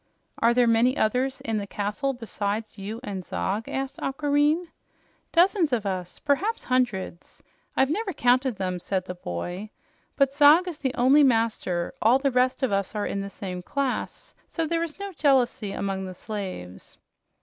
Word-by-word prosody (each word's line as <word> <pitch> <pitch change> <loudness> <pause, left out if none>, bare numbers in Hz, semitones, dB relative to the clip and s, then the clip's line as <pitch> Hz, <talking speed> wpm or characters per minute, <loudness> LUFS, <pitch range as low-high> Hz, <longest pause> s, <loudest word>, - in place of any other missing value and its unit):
"Are 235 +1 +4
there 245 -1 +5
many 235 +3 +3
others 255 +5 0
in 225 -1 -1
the 200 - -5
castle 210 +8 -2
besides 215 -3 -4
you 210 +4 -5
and 195 -6 -5
Zog?" 130 - -3
asked 270 0 -4
Aquareine. 290 +4 +1 0.7
"Dozens 345 -2 +3
of 230 -4 0
us. 185 -2 -3
Perhaps 345 +11 0
hundreds. 240 -9 -2 0.3
I've 265 +2 +3
never 410 +3 -1
counted 250 -3 +2
them," 185 -2 -2
said 185 +1 -2
the 180 - -5
boy. 175 - -5 0.5
"But 275 -1 +2
Zog 300 +5 +6
is 330 -4 -5
the 265 -2 -2
only 265 +4 +5
master; 225 -8 +1
all 235 +4 +5
the 275 0 0
rest 255 +2 +1
of 260 - +2
us 195 +1 -1
are 210 - -1
in 200 - -2
the 200 - -5
same 185 -3 -6
class, 270 +6 -3
so 330 - -2
there 335 +1 0
is 335 -2 -4
no 400 -1 -6
jealousy 260 - +2
among 195 -1 -3
the 185 -1 -7
slaves." 185 - -7
240 Hz, 170 wpm, -26 LUFS, 200-280 Hz, 0.7 s, Zog